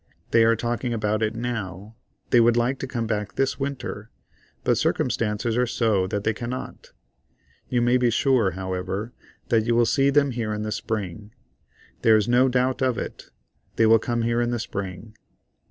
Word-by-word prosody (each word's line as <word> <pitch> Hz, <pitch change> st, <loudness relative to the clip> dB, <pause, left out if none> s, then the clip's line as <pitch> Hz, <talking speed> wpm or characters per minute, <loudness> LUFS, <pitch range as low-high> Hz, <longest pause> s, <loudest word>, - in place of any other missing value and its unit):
They 115 Hz, -, +5 dB
are 115 Hz, 0 st, +4 dB
talking 120 Hz, +1 st, -2 dB
about 105 Hz, -1 st, -1 dB
it 110 Hz, +1 st, 0 dB
now. 110 Hz, -3 st, -5 dB, 0.4 s
They 120 Hz, -, +6 dB
would 120 Hz, 0 st, +4 dB
like 125 Hz, +3 st, +1 dB
to 135 Hz, -, -4 dB
come 120 Hz, -3 st, -3 dB
back 105 Hz, -2 st, -3 dB
this 135 Hz, +1 st, 0 dB
Winter, 135 Hz, -6 st, -5 dB, 0.5 s
but -, -, +2 dB
circumstances 110 Hz, +1 st, 0 dB
are 125 Hz, 0 st, +2 dB
so 110 Hz, -6 st, +1 dB
that 100 Hz, +1 st, -3 dB
they 110 Hz, -, +1 dB
cannot. 120 Hz, +3 st, -7 dB, 0.8 s
You 120 Hz, -1 st, +1 dB
may 120 Hz, +1 st, +4 dB
be 125 Hz, -1 st, +2 dB
sure, 120 Hz, -, +2 dB
however, 95 Hz, +4 st, -4 dB, 0.4 s
that 110 Hz, -2 st, +3 dB
you 120 Hz, -, +2 dB
will 120 Hz, 0 st, +4 dB
see 135 Hz, +2 st, +3 dB
them 140 Hz, -1 st, +3 dB
here 115 Hz, -3 st, -2 dB
in 105 Hz, -, -4 dB
the 110 Hz, -, -3 dB
Spring. 105 Hz, -2 st, -4 dB, 0.7 s
There 110 Hz, -1 st, +6 dB
is 105 Hz, -, 0 dB
no 125 Hz, +2 st, +4 dB
doubt 130 Hz, +1 st, 0 dB
of 130 Hz, -2 st, +1 dB
it; -, -, -6 dB, 0.5 s
they 115 Hz, -, +4 dB
will 110 Hz, 0 st, +6 dB
come 120 Hz, +1 st, -1 dB
here 120 Hz, +1 st, +1 dB
in 120 Hz, -, 0 dB
the 120 Hz, -, -1 dB
Spring. 100 Hz, -1 st, -6 dB
115 Hz, 185 wpm, -24 LUFS, 105-125 Hz, 0.8 s, They